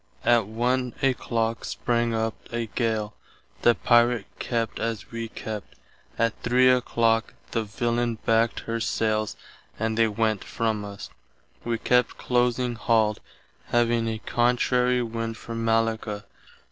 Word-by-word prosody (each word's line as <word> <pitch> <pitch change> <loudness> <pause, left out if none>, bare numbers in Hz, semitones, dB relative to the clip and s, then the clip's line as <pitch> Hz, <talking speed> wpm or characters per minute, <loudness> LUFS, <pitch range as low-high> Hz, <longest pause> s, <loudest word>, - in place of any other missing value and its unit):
Att 120 -4 +4
1 125 +2 0
a 135 -1 +4
clock 115 -2 -2
sprang 120 -1 0
up 110 0 0 0.2
a 120 0 -1
gale. 110 -2 -1 0.5
The 120 - +5
Pirate 120 -2 +3
kept 115 -2 -2
as 115 -2 -3
wee 115 -1 -4
kept. 110 -3 -7 0.4
Att 115 -1 +2
3 125 +2 +5
a 125 -1 +3
clock 115 -1 +1 0.2
the 115 - 0
villain 120 +2 -1
backt 115 +1 +2
her 115 0 -3
sailes 110 0 0 0.4
and 110 0 -1
they 115 - +5
went 110 -1 0
from 110 -2 -1
us. 100 -1 -8 0.5
Wee 115 -1 -1
kept 125 +2 +2
close 125 -1 +1
halled, 115 -3 +1 0.5
having 120 -1 +2
a 110 -1 -2
contrary 125 +2 +2
wind 115 -1 -4
for 115 - -8
Mallacca. 115 -2 0
115 Hz, 135 wpm, -26 LUFS, 110-120 Hz, 0.5 s, The